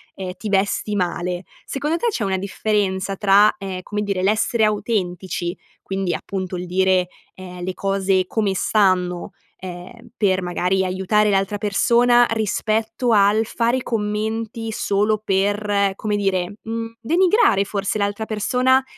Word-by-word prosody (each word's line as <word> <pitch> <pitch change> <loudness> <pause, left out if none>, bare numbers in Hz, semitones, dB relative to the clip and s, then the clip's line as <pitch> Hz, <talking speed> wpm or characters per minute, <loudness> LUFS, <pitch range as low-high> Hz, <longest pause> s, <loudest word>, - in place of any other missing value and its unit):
ehm, 185 -1 -5
ti 215 - -5
vesti 200 +1 0
male. 180 -1 -2 0.2
Secondo 295 +4 -2
te 475 - -1
c'è 255 - -2
una 190 -1 0
differenza 195 -1 -1
tra, 205 +1 +5
ehm, 190 -2 -5
come 210 +2 -3
dire 200 -3 -1
l'essere 220 +3 +2
autentici, 190 -4 -2 0.3
quindi 190 -2 -2
appunto 185 -2 -4
il 180 - -5
dire, 185 0 +2 0.3
ehm, 180 -1 -9
le 185 +1 -3
cose 195 -1 +1
come 205 -2 0
stanno, 185 -4 +1 0.3
ehm, 185 +6 -10
per 190 -3 +2
magari 180 +1 0
aiutare 190 +3 +1
l'altra 195 +1 +1
persona, 235 +4 +4
rispetto 220 +2 0
al 210 +1 +4
fare 235 +3 0
i 255 - -4
commenti 220 +1 -2
solo 210 0 0
per, 200 0 +1
come 210 +1 -2
dire, 195 -1 -1
mhmm, 230 0 -5
denigrare 340 - +3
forse 200 +1 -2
l'altra 205 +1 -1
persona, 250 +5 +2
200 Hz, 140 wpm, -21 LUFS, 190-220 Hz, 0.3 s, tra